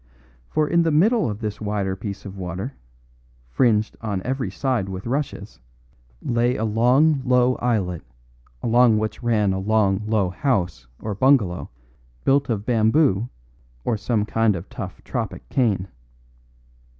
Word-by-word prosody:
For 155 -1 +1
in 170 +2 +3
the 165 - +2
middle 200 - +3
of 105 +1 -5
this 105 -1 -4
wider 100 -2 -1
piece 100 +1 -7
of 100 -1 -8
water, 95 +7 -5 0.7
fringed 110 - +1
on 100 -4 -3
every 130 0 -2
side 125 -8 -1
with 95 0 -6
rushes, 140 - -3 0.6
lay 120 +1 +1
a 110 - -1
long, 130 +7 +3
low 125 0 +3
islet, 100 -9 -1 0.6
along 120 -1 +4
which 110 +2 -3
ran 105 -5 +2
a 95 - -2
long, 100 -1 +2
low 105 -5 +1
house 90 - -1
or 105 - -4
bungalow 105 -5 +2 0.5
built 140 0 +2
of 105 -3 -1
bamboo 115 -1 +2 0.6
or 115 - +1
some 105 0 0
kind 110 -1 +2
of 85 +1 -7
tough - - -7
tropic - - -4
cane. 105 -8 +1
110 Hz, 140 wpm, -23 LUFS, 100-125 Hz, 0.7 s, along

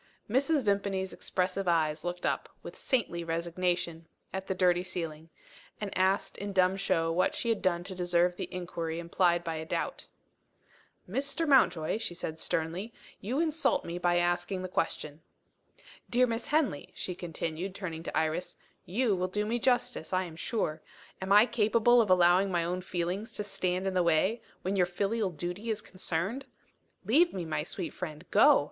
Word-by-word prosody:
Mrs. 275 +5 +2
Vimpany's 200 -2 0
expressive 185 +1 -1
eyes 160 -3 +2
looked 175 0 -3
up, - - -1
with - - -8
saintly 200 -10 -1
resignation, 170 0 -1 0.3
at 190 0 -4
the 190 - -1
dirty 180 -1 +3
ceiling 165 -3 -5 0.5
and 205 -2 -4
asked 190 +1 +1
in 200 0 -4
dumb 185 0 +4
show 165 -4 +1
what 185 +3 +1
she 235 - -1
had 225 - +1
done 175 -2 +1
to 190 +1 -7
deserve 175 0 +2
the - - -3
injury 170 -2 -4
implied 170 0 +2
by 165 -1 -3
a 160 - -4
doubt. 160 - -3 1.0
"Mr. 280 - 0
Mountjoy," 220 - +4
she 225 -6 -3
said 160 -2 -5
sternly, 170 +9 -1 0.3
"you 245 +8 -2
insult 315 -3 +1
me 170 +1 -4
by 175 0 +2
asking 175 +2 0
the - - -2
question." 155 -3 -2 0.9
"Dear 250 +1 +4
Miss 230 -1 -3
Henley," 285 - 0
she 180 - -4
continued, 175 +1 -4
turning 165 -5 -5
to 165 - -4
Iris, 160 +3 -1 0.3
"you 215 +2 +1
will 185 0 -1
do 210 +3 -1
me 235 +3 0
justice, 245 -9 +1
I 185 0 +2
am 170 -3 -8
sure. 160 -4 -2 0.4
Am 190 +1 -3
I 210 +2 +8
capable 235 +1 +4
of 215 - 0
allowing 180 +1 +5
my 175 -2 +1
own 180 +2 -2
feelings 180 +4 -3
to 210 - -2
stand 190 -2 -1
in 190 - 0
the 185 - +3
way, 170 +7 +2 0.2
when 190 +2 -1
your 180 -2 +3
filial 200 +3 0
duty 175 +7 -5
is 215 -1 0
concerned? 195 +7 -2 0.6
Leave 310 - +4
me, 180 -3 -3
my 155 -2 -1
sweet 170 +3 -4
friend. 155 -2 -6
Go! 280 +7 +7
185 Hz, 175 wpm, -30 LUFS, 170-210 Hz, 1.0 s, I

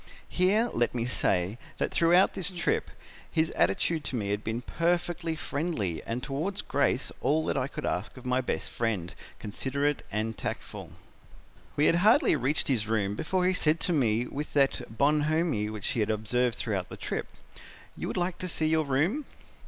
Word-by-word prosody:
Here, 200 +6 +3
let 120 +1 +1
me 115 -1 0
say, 100 -3 0 0.2
that - - -1
throughout 175 +3 +4
the 190 - -4
trip 180 -1 0 0.4
his 160 0 +1
attitude 145 - +1
to - - -2
me 105 -4 -2
had 105 +1 -1
been 115 +2 -3
perfectly 170 0 0
friendly 140 - -2
and 120 +2 -3
towards 155 +9 -2
Grace 135 -2 +1
all 155 +2 +2
that - - 0
I 130 - 0
could - - -6
ask 95 +8 -2
of 125 - -11
my 125 +1 +2
best 125 - -3
friend, 105 -7 -2 0.2
considerate 140 +7 -1
and 110 +1 -1
tactful. - - -5 0.9
"'We 150 - +3
had 165 - +5
hardly 220 - +5
reached 135 +5 +1
his 115 -6 +1
room 105 -3 0
before 180 - 0
he 185 - +3
said 160 -2 +2
to 180 - +1
me 120 -5 +2
with 145 +4 -5
that 135 -5 +1
bonhomie 150 -5 +2
which 105 -3 -4
he - - -1
had 105 0 +1
observed 110 +3 +1
throughout 95 -5 -2
the - - -8
trip, - - -3 0.7
'You - - -4
would - - -3
like 175 0 -1
to 185 - -3
see 160 -2 0
your 160 0 +2
room?' 165 - +1
140 Hz, 180 wpm, -29 LUFS, 110-165 Hz, 0.9 s, had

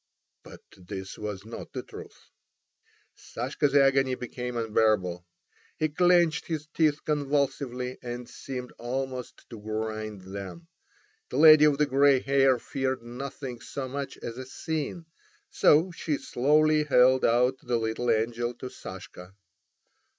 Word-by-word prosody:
But - - -14
this 95 +1 -8
was 105 -2 -6
not 115 - -9
the - - -4
truth. - - -12 0.9
Sashka's 140 +4 -2
agony 135 -2 +4
became 125 -1 -5
unbearable. 105 -6 +1 0.5
He 155 - 0
clenched 175 0 +3
his 155 -3 -3
teeth 155 -2 +1
convulsively, 140 -4 -1
and 120 0 -6
seemed 125 -2 -7
almost 130 +1 -5
to 115 - -8
grind 110 -1 -4
them. 100 - -8 0.6
The - - -4
lady 155 -1 +9
of 145 -2 +3
the 150 - +3
grey 140 -1 +4
hair 135 -1 +3
feared 130 +1 -3
nothing 125 +1 -7
so 130 +4 -6
much 140 +1 -5
as 120 +2 -6
a 130 - -6
scene, 160 +4 -4 0.5
so 160 +5 +4
she 160 -3 -2
slowly 150 +4 +2
held 130 -2 +4
out 125 +3 +3
the 120 -2 -1
little 115 +2 -2
angel 120 +2 0
to 130 +1 -8
Sashka. 95 0 -10
130 Hz, 130 wpm, -27 LUFS, 115-145 Hz, 0.9 s, lady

